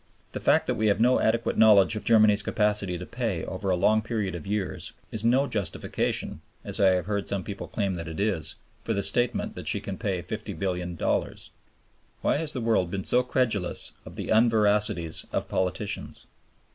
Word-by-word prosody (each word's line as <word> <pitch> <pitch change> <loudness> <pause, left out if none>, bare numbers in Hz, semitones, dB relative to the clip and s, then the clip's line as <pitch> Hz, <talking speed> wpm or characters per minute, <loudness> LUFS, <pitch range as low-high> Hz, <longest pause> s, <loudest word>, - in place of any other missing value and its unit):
The - - -5
fact - - +3
that - - 0
we 110 - 0
have 100 0 +2
no 125 +3 +4
adequate 115 +1 +1
knowledge 105 -2 +6
of 110 - -5
Germany's 110 -2 +5
capacity 105 -4 0
to 90 - -7
pay 115 -8 -3
over 95 +1 -4
a 90 - +3
long 105 +4 +3
period 110 -3 -2
of 85 -1 -7
years 100 -2 -3 0.2
is 110 - -1
no 125 +4 +3
justification 105 - -2 0.2
(as - - -2
I 95 -2 +5
have 90 - -2
heard 100 -1 -2
some 100 -2 -2
people 100 -1 -6
claim 100 -3 -1
that, 85 -2 -5
it 80 +2 -6
is) 100 -6 0 0.3
for 115 - -1
the 100 - 0
statement 120 +3 +1
that - - -7
she - - +1
can 100 -2 -6
pay 95 -6 -2
$50,000,000,000. 90 -4 -3 0.7
Why - - +2
has 155 0 -1
the 130 - -2
world 110 -6 +1
been 95 +1 -3
so 125 - +3
credulous 125 -7 -1
of - - -11
the - - -5
unveracities 105 -6 +2
of - - -2
politicians? 95 +3 -3
105 Hz, 185 wpm, -26 LUFS, 95-110 Hz, 0.7 s, knowledge